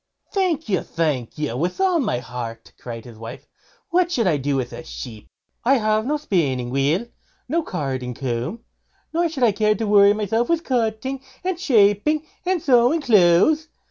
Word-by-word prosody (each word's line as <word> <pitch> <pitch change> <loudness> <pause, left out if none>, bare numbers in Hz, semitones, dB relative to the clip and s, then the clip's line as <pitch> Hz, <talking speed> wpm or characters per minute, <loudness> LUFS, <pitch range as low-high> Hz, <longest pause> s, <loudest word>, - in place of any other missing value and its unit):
"Thank 360 -5 0
you! 190 -4 +1
thank 150 -8 -2
you! 150 -6 -2
with 175 - -2
all 375 -3 +3
my 240 - 0
heart", 115 -1 -7
cried 115 -1 -8
his 115 -3 -12
wife; 115 +3 -9 0.5
"what 350 0 +2
should 240 -9 +1
I 165 -5 +3
do 140 0 -1
with 130 -2 -2
a - - -7
sheep? 115 -8 -9 0.4
I 270 +3 +4
have 215 0 +1
no 300 +2 +1
spinning 140 - -1
wheel, 145 - +1 0.4
nor 330 +5 0
carding 130 - -4
comb, 130 - -3 0.5
nor 340 +1 +1
should 285 -5 -3
I 230 - +5
care 210 +1 +2
to 225 - -2
worry 205 -1 +6
myself 215 +3 -1
with 335 -1 +1
cutting, 250 +1 -1 0.2
and 365 -2 -2
shaping, 250 - +3 0.2
and 370 -1 +2
sewing 255 +4 +4
clothes. 220 - +4
210 Hz, 175 wpm, -22 LUFS, -, 0.5 s, worry